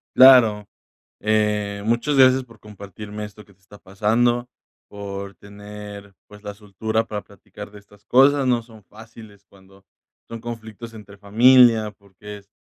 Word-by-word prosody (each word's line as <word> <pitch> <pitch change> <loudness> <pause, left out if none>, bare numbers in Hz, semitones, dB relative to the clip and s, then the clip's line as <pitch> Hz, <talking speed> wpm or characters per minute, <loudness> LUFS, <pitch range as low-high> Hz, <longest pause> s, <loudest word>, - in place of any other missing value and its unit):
Claro, 115 -6 +6 0.5
eh, 105 -1 -1
muchas 120 +6 0
gracias 130 0 +5
por 115 -3 -19
compartirme 105 0 -10
esto 105 0 -14
que 100 - -23
te 95 - -37
está 95 +2 -17
pasando, 120 +5 -1 0.4
por 100 -1 -8
tener, 100 +1 -12
pues, 105 0 -16
la 105 - -7
soltura 110 +2 -4
para 105 -1 -6
platicar 100 +1 -13
de 105 - -13
estas 100 0 -23
cosas. 135 +1 +3
No 120 -2 +1
son 110 -2 -18
fáciles 110 0 -16
cuando 95 0 -22 0.4
son 115 -1 -9
conflictos 115 -1 -9
entre 100 -2 -14
familia, 115 +1 +4
porque 105 +1 -13
es 100 0 -26
105 Hz, 145 wpm, -21 LUFS, 100-115 Hz, 0.5 s, Claro